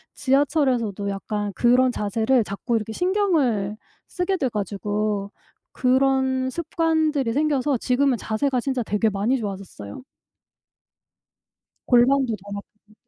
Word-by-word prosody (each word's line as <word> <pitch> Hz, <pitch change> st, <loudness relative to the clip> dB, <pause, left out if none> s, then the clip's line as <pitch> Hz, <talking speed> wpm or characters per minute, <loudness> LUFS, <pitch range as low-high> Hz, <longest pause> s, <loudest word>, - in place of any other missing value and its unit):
지하철에서도 260 Hz, -, +1 dB
약간 205 Hz, +1 st, -3 dB
그런 250 Hz, +4 st, +3 dB
자세를 225 Hz, +3 st, +1 dB
자꾸 205 Hz, +4 st, -3 dB
이렇게 220 Hz, 0 st, -5 dB
신경을 300 Hz, -, +1 dB, 0.3 s
쓰게 365 Hz, +1 st, -1 dB
돼 265 Hz, -7 st, 0 dB
가지고 205 Hz, 0 st, -2 dB, 0.4 s
그런 260 Hz, 0 st, +1 dB
습관들이 315 Hz, -4 st, 0 dB
생겨서 285 Hz, -1 st, +1 dB
지금은 255 Hz, +2 st, +1 dB
자세가 250 Hz, +5 st, -1 dB
진짜 260 Hz, 0 st, -1 dB
되게 220 Hz, 0 st, +1 dB
많이 210 Hz, +6 st, 0 dB
좋아졌어요. 195 Hz, -, -7 dB, 1.9 s
골반도 250 Hz, -1 st, +4 dB
덜 200 Hz, 0 st, -8 dB
아프고 210 Hz, +1 st, -14 dB
245 Hz, 275 characters per minute, -23 LUFS, 210-275 Hz, 1.9 s, 골반도